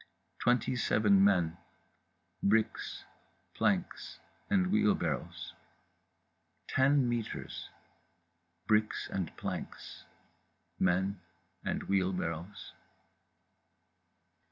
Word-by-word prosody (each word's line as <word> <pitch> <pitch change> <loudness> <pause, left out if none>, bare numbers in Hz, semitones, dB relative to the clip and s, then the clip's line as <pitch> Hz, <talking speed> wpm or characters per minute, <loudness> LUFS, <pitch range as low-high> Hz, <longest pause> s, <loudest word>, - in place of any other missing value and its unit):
Twenty 125 +1 +2
seven 105 -5 +4
men, 90 -5 +3 0.8
bricks, 110 +2 +1 0.5
planks - - -1 0.3
and 190 -2 +2
wheelbarrows. 200 - 0 1.1
Ten 135 0 +3
metres. 120 -2 -4 1.0
Bricks 110 0 +2
and 95 -4 -3
planks. - - -6 0.7
Men 95 +1 +1 0.4
and - - -2
wheelbarrows…. 90 -1 -2
100 Hz, 60 wpm, -32 LUFS, 95-125 Hz, 1.1 s, seven